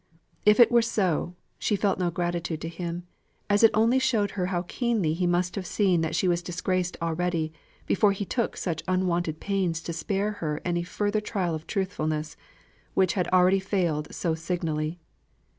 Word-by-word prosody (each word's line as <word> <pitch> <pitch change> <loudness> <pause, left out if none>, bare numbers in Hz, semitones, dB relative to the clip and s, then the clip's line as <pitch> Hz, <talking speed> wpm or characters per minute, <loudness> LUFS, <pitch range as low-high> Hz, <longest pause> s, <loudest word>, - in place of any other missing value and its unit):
If 210 +2 +6
it 240 - +8
were 240 0 +6
so, 185 -6 0 0.2
she 210 - +1
felt 195 -1 +1
no 180 -1 +1
gratitude 175 -1 -2
to 165 - -4
him, 170 +1 -5 0.5
as 205 - +4
it 225 - +8
only 230 +4 +4
showed 225 -6 +1
her 180 -3 -2
how 180 -2 -1
keenly 215 -5 0
he 175 +2 0
must 175 +1 +1
have 190 -3 -4
seen 185 -5 +2
that 160 - -1
she 185 - +1
was 175 -1 +2
disgraced 180 +1 -2
already, 165 -1 -1 0.3
before 200 +1 +3
he 200 +1 -3
took 235 +3 -1
such 165 -4 -2
unwonted 175 -3 0
pains 190 -5 0
to 170 - -4
spare 200 +4 -1
her 150 -2 -1
any 175 -1 0
further 205 +4 -1
trial 190 -5 -1
of 155 0 -6
truthfulness, 155 -6 -2 0.6
which 185 -2 +3
had 180 -3 0
already 185 +1 +4
failed 175 -6 -1
so 170 -3 -1
signally. 160 -1 -2
180 Hz, 175 wpm, -27 LUFS, 170-200 Hz, 0.6 s, it